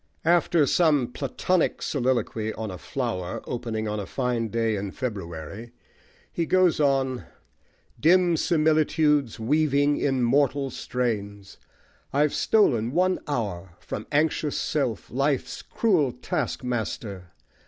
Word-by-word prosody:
After 170 -2 +4
some 145 -5 +3
Platonic 150 +7 0
soliloquy 120 -5 -1
on 110 -2 -5
a 90 - -8
flower 105 -9 -3
opening 110 -3 -3
on 105 0 -2
a 100 - -5
fine 125 -3 -1
day 115 0 0
in 100 0 -3
February, 100 - -6 0.6
he 165 -2 -1
goes 185 -3 +3
on 135 -3 +1 0.7
Dim 175 +1 +4
similitudes 155 -5 +2
Weaving 145 +3 +2
in 135 -3 0
mortal 135 +2 +2
strains, 100 -6 -4 0.5
I've 145 +1 +2
stolen 120 - +2
one 185 +2 +2
hour 95 - -3
From 105 - -6
anxious 150 0 +1
self, 130 -7 -2
life's 135 +1 -1
cruel 175 - +1
taskmaster! 120 - -3
130 Hz, 110 wpm, -25 LUFS, 110-150 Hz, 0.7 s, After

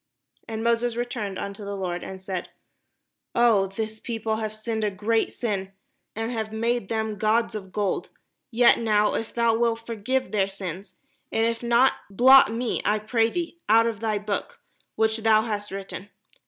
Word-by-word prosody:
And 225 0 -4
Moses 235 0 +1
returned 230 -5 -3
unto 200 +1 -6
the 200 0 -5
Lord, 180 -2 -3
and 190 0 -7
said, 185 -1 -5 0.9
"Oh, 230 -5 +4
this 220 +3 -5
people 225 -2 -2
have 215 -1 -3
sinned 220 0 -3
a 210 - +2
great 215 +3 0
sin, 195 -5 -3 0.4
and 225 +2 -2
have 220 -2 -3
made 230 -1 -1
them 220 -2 -2
gods 225 +2 +2
of 195 -3 -7
gold. 200 0 -1 0.4
Yet 240 0 +5
now, 210 -2 +2
if 225 - -3
thou 235 -1 +2
wilt 230 0 0
forgive 240 +4 -2
their 195 -2 +1
sin 190 -1 -6 0.2
—; - - -44
and 225 - +2
if 230 0 -1
not, 240 +2 +4 0.2
blot 255 +4 +7
me, 235 +1 -1
I 210 - +2
pray 225 +2 +1
thee, 340 +3 -4
out 225 +1 +6
of 230 -3 -2
thy 220 -1 0
book 210 - -4 0.4
which 220 0 +2
thou 220 -1 +4
hast 210 -2 -3
written." 195 0 -7
220 Hz, 175 wpm, -25 LUFS, 205-230 Hz, 0.9 s, blot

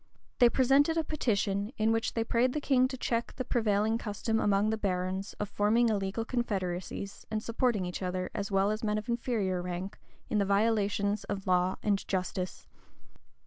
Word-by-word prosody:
They 245 - +7
presented 275 +6 +3
a 325 - +2
petition, 205 -8 -1
in 220 +1 +2
which 225 0 0
they 225 - +1
prayed 240 +2 +1
the 300 - -1
king 260 -3 +3
to 260 0 -6
check 235 -1 -1
the 255 - -3
prevailing 220 -1 +1
custom 225 +1 -1
among 205 +1 +2
the 220 - 0
barons 190 0 -2
of 210 - -4
forming 215 +4 +2
illegal 205 +1 -1
confederacies, 195 -5 -3
and 215 0 -2
supporting 230 -4 0
each 180 +2 -5
other, 185 0 -2
as 200 0 -3
well 195 +1 +2
as 215 +1 -3
men 210 -1 +1
of 215 +2 -5
inferior 220 -6 0
rank, 180 +2 -5 0.3
in 210 - 0
the - - +3
violations 205 0 +1
of 195 -2 -4
law 180 0 +2
and 200 -2 0
justice. 185 -1 -3
210 Hz, 180 wpm, -30 LUFS, 195-230 Hz, 0.3 s, They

